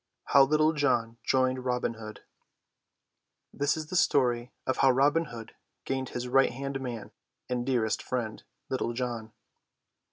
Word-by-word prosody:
HOW 140 -1 +8
LITTLE 155 +2 +3
JOHN 120 -6 +1
JOINED 130 -1 +1
ROBIN 125 -2 0
HOOD 110 -1 -9 1.3
This 145 +2 +1
is 155 - -4
the - - -2
story 125 -7 +2
of 130 - 0
how 135 - +5
Robin 145 +5 +3 0.6
gained 130 -1 -2
his 125 0 -4
right 135 +2 +4
hand 135 +2 -4
man 120 -4 -6 0.4
and 125 0 -2
dearest 115 -5 +1
friend, 115 -4 -3 0.3
Little 125 -2 -2
John. 120 -3 -4
130 Hz, 135 wpm, -29 LUFS, 120-135 Hz, 1.3 s, HOW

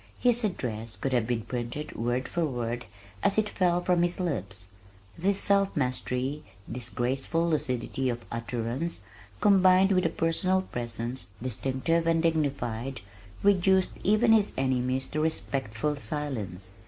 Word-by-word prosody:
His 245 -1 +3
address 115 - -3
could 135 - -2
have 120 -3 +2
been 120 -2 -1
printed 120 +5 -4
word 120 +3 -1
for 170 - -1
word 120 -4 -2 0.4
as 195 - +2
it 215 -1 +3
fell 180 -3 +1
from 180 -1 +3
his 175 +2 +2
lips. 100 - -3 0.5
This 195 +3 +1
self 200 -1 +3
mastery, 130 +1 -1 0.3
this 120 -1 -5
graceful 135 +8 0
lucidity 130 -4 -1
of 120 -1 -4
utterance 115 +4 -3 0.4
combined 190 -1 +6
with 185 -2 +3
a - - -1
personal 185 +4 +2
presence 120 - -5
distinctive 135 +7 -1
and 165 0 +3
dignified, 135 - -1 0.4
reduced 190 -1 +4
even 215 +3 +4
his 210 -2 +3
enemies 130 0 +1
to 155 - -2
respectful 140 -4 -1
silence. 110 - -4
135 Hz, 135 wpm, -28 LUFS, 120-175 Hz, 0.5 s, combined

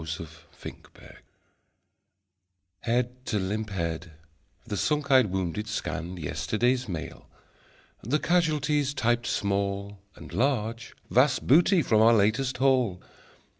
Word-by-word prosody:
Smile, 80 +1 -5 0.3
Smile, - - -7 0.2
Smile - - -14 1.7
Head 125 +1 -1
to 105 - 0
limp 105 +3 -2
head, 85 -3 -4 0.5
the 105 - -4
sunk 145 +6 0
eyed 130 -4 +6
wounded 95 +2 -3
scanned 90 -4 -4
Yesterday's 120 - -1
Mail; 80 -2 -7 0.7
the 130 +8 0
casualties 150 -4 +1
(typed 120 -2 0
small) 100 0 -2 0.2
And - - -12
(large) 115 -3 -1 0.2
Vast 130 +2 +3
Booty 170 - +5
from 110 -3 +3
our 115 +1 +6
Latest 115 +6 +1
Haul. 130 -8 +2
115 Hz, 115 wpm, -27 LUFS, 100-130 Hz, 1.7 s, eyed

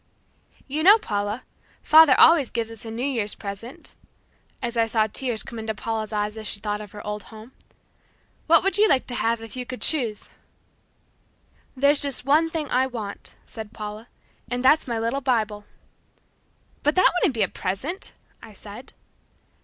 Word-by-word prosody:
"You 290 +3 -2
know, 400 +6 +8
Paula, 205 - -3 0.4
father 310 -4 +7
always 320 -7 +7
gives 230 -1 -3
us 225 0 -9
a - - -6
New 230 +3 -3
Year's 230 -7 -1
present," 205 +5 -8 0.6
as 240 -1 -4
I 230 -1 +2
saw 220 -1 +2
tears 235 +1 -2
come 235 - -8
into 220 0 -4
Paula's 220 0 -4
eyes 210 +1 -2
as 215 - -5
she 205 - -3
thought 210 0 -3
of 210 -2 -10
her 205 - -9
old 210 0 -4
home. 220 +2 -13 1.0
"What 335 +1 +5
would 390 +1 +1
you 430 - +6
like 265 - +3
to 245 - -6
have 230 -1 0
if 225 +2 -6
you 250 - -4
could 255 0 -7
choose?" 235 -9 0 1.5
"There's 280 +2 +4
just 275 -3 -2
one 310 +4 +3
thing 320 -2 -3
I 260 +1 +2
want," 220 -5 -7
said 220 -1 -9
Paula, 215 +1 -7 0.4
"and 245 +1 -2
that's 300 +3 +4
my 235 -2 -2
little 230 +5 -1
Bible." 215 -5 -1 1.2
"But 295 +1 +1
that 370 - +5
wouldn't 330 - +1
be 220 - +2
a - - +1
present," 255 - -4 0.3
I 220 - -13
said. 210 +5 -11
230 Hz, 175 wpm, -24 LUFS, 215-275 Hz, 1.5 s, know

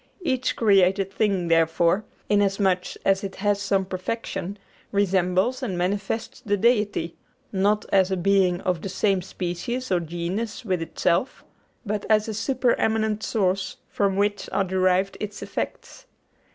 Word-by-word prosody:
Each 260 -6 0
created 195 -2 +3
thing, 195 -5 +1
therefore, 165 +4 +3 0.2
inasmuch 195 -3 +1
as 195 0 +3
it 195 -1 -5
has 205 0 0
some 195 -1 +1
perfection, 190 +1 -4 0.3
resembles 195 +5 +1
and 200 -9 -2
manifests 200 +6 -2
the 205 -5 0
Deity; 205 -6 +1 0.3
not 205 +2 +1
as 190 -1 +4
a 190 - 0
being 185 -1 +2
of 180 -3 -1
the 195 - -4
same 195 0 +1
species 190 +8 -4
or 180 - +3
genus 175 +8 -4
with 185 -4 0
itself, 170 +7 0 0.4
but 210 -1 -3
as 215 0 +4
a 220 - -3
supereminent 220 -2 +1
source 190 -4 0
from 200 -2 0
which 205 +1 0
are 195 +1 +1
derived 190 +1 +1
its 210 -1 -5
effects. - - -6
195 Hz, 140 wpm, -24 LUFS, 185-210 Hz, 0.4 s, as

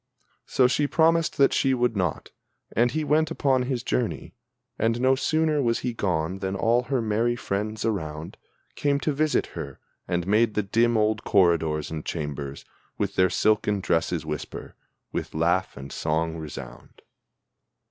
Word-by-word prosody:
So 130 - +3
she 140 +3 +2
promised 165 +1 +2
that 140 - +4
she 135 -1 +2
would 120 -2 +1
not, 90 -5 -2 0.4
and 120 +3 +4
he 155 +5 -2
went 150 +1 +2
upon 135 -2 +1
his 125 -1 -2
journey. 95 - -2 0.5
And 115 +2 +1
no 130 +1 +4
sooner 155 +2 +1
was 115 -3 +1
he 125 -1 -2
gone 90 -3 -1
than 95 0 -2
all 115 +5 +2
her 125 -1 -1
merry 115 +2 +1
friends 105 -1 -3
around 80 -7 -3 0.4
Came 140 -1 +1
to 150 - 0
visit 155 +2 +1
her, 70 -1 -7 0.3
and 90 -1 -1
made 105 +3 +2
the 105 - +1
dim 115 +4 +2
old 110 0 +1
corridors 80 -5 +2
and 80 -1 -4
chambers 70 -3 -5 0.3
With 100 -1 -1
their 95 -1 +3
silken 105 0 +2
dresses 85 -3 0
whisper, 75 -1 -6 0.4
with - - -4
laugh 85 +4 +1
and 70 0 -8
song 80 +1 -1
resound. 75 -6 -9
105 Hz, 155 wpm, -25 LUFS, 85-125 Hz, 0.5 s, that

